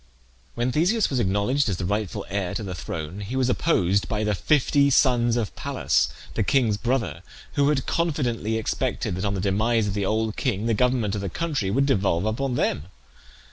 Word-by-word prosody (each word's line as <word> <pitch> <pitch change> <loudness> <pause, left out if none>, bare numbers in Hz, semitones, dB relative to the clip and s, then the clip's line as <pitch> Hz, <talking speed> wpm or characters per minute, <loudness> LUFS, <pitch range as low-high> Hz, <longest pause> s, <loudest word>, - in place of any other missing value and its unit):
When 120 +2 0
Theseus 185 - +2
was 130 - 0
acknowledged 110 +6 +1
as 95 - -1
the 90 - -3
rightful 105 0 -2
heir 95 -1 -2
to 115 - -3
the 95 -2 -5
throne 85 +1 -6
he 105 +5 -5
was 130 -1 +1
opposed 100 - +1
by 110 -1 -1
the 105 -1 +1
fifty 140 - +3
sons 120 -3 +3
of 110 -5 -2
Pallas, 60 - 0 0.2
the - - -1
king's 120 -6 +2
brother, 110 - -1 0.3
who 140 -1 +3
had 140 -3 0
confidently 125 -10 -1
expected 110 - -2
that 95 +3 -3
on 100 0 0
the - - -2
demise 110 +4 +1
of 100 - -2
the 100 -1 -1
old 110 0 0
king 100 +4 -1
the 115 - +2
government 120 -2 +1
of 100 - -2
the 100 - -3
country 145 - -2
would 135 +7 +2
devolve 100 -8 +1
upon 125 +4 -1
them. 75 -10 0
110 Hz, 195 wpm, -24 LUFS, 100-130 Hz, 0.3 s, fifty